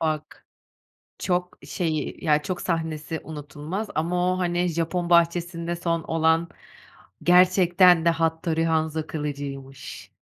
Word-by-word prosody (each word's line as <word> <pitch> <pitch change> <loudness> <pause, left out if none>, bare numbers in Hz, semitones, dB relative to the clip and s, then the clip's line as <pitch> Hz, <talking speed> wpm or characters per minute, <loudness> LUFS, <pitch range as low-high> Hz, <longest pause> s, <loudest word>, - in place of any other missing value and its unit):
Bak, 155 -2 -3 0.7
çok, 180 -1 -2
şeyi, 160 -4 -3
ya, 150 -2 +3
çok 180 +2 -4
sahnesi 160 -2 -3
unutulmaz 150 +7 -6
ama 180 +3 +1
o, 185 - -4
hani, 175 0 0
Japon 170 +1 -2
bahçesinde 170 0 +2
son 170 -1 -1
olan, 160 +1 +1 0.7
"Gerçekten 180 -1 +5
de 170 - +5
Hattori 165 0 0
Hanzo 160 -1 0
kılıcıymış." 140 -3 -6
165 Hz, 110 wpm, -25 LUFS, 155-175 Hz, 0.7 s, Gerçekten